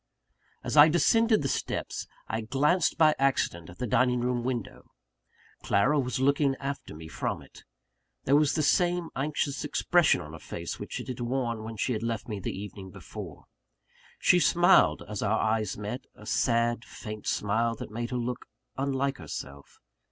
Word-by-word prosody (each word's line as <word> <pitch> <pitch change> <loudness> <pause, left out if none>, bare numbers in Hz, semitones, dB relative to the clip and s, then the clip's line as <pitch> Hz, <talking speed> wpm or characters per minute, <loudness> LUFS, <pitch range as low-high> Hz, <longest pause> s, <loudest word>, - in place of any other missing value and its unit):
As - - -3
I 150 +2 +10
descended 220 +5 +3
the - - 0
steps, - - -3 0.2
I 110 - -2
glanced 140 +10 +1
by 155 -2 +6
accident 110 - 0
at 85 - -12
the 125 - -2
dining 125 +2 +2
room 120 0 -1
window. 120 -4 -4 0.7
Clara 130 +10 +2
was 130 0 -2
looking 140 0 +2
after 140 - -6
me 80 +1 -9
from - - -3
it. - - -16 0.6
There 140 - +3
was 150 0 +3
the 155 - +1
same 175 +2 +2
anxious 140 0 -1
expression 175 - +3
on 80 -2 -9
her 80 - -8
face - - -6
which - - -5
it - - -7
had 125 -1 -5
worn 120 -2 -2
when 110 0 -7
she 110 +1 0
left 115 0 -3
me 105 -3 -4
the 95 - -3
evening 100 -1 -8
before. - - -9 0.7
She - - +4
smiled - - +4
as - - -5
our - - +1
eyes 110 -2 0
met 105 +6 -5
a 105 - -14
sad, 115 +1 +1
faint 105 -3 -8
smile 115 +3 0
that 110 - -8
made 120 +2 -4
her 125 - -2
look 120 +1 -4 0.3
unlike 135 0 -1
herself. 70 0 -8
125 Hz, 170 wpm, -28 LUFS, 110-140 Hz, 0.7 s, I